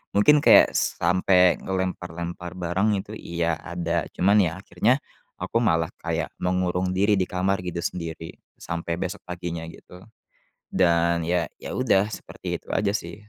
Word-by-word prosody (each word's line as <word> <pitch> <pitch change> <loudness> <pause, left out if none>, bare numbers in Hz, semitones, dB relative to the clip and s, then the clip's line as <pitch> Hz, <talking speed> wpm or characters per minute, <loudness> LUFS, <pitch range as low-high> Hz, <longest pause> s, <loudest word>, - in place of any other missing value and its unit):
mungkin 150 +9 +6
kayak - - +7
sampai 90 +1 +3
ngelempar-lempar 90 -2 -4
barang 90 +4 0
itu, 105 +2 -13
iya, 85 -1 -2
ada, 85 0 -2
cuman, 100 +4 +4
ya, 90 -5 +3
akhirnya 105 +9 +2 0.5
aku - - -1
malah 80 -9 +2
kayak - - -2
mengurung 90 0 0
diri 100 +1 +3
di 95 - +2
kamar, 95 +1 0
gitu, 85 -1 -4
sendiri 80 -2 -5 0.2
sampai 85 0 -4
besok 95 +3 -4
paginya, 85 -2 -5
gitu. 90 +2 -13 0.7
Dan, 85 -2 +2
ya 85 -1 0
ya, - - -8
udah, 105 -5 +2
seperti - - -6
itu - - -31
aja, 100 - +1
sih. 105 - -4
90 Hz, 145 wpm, -24 LUFS, 85-95 Hz, 0.7 s, kayak